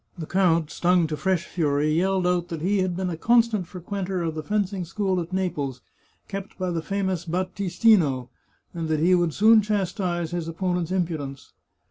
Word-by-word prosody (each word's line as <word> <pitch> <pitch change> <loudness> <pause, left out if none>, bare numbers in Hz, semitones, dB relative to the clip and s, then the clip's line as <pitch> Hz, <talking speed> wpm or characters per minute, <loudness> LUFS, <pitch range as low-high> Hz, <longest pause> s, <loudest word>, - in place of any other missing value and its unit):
The 165 - -5
count, 170 -3 +2
stung 180 -1 +2
to 155 -1 -3
fresh 175 +3 0
fury, 150 -2 0
yelled 185 +2 +1
out 180 -1 +1
that 165 -3 -5
he 200 +2 +2
had 185 -2 0
been 185 -1 -1
a - - -3
constant 230 -2 +2
fre 180 - -10
quenter 185 0 -3
of 160 - -2
the 155 - -4
fencing 200 0 -1
school 190 0 -1
at 170 +2 -7
Naples, 145 -9 -2 0.5
kept 195 0 -7
by 185 -1 -2
the 165 -1 -2
famous 190 -1 -2
Battistino, 180 - +2 0.4
and 165 -2 -3
that 155 -1 +1
he 175 +4 +4
would 175 -4 +2
soon 220 +1 +6
chastise 185 -4 -1
his 175 -2 -3
opponent's 175 0 -2
impudence. 160 -7 -3
180 Hz, 180 wpm, -25 LUFS, 165-190 Hz, 0.5 s, soon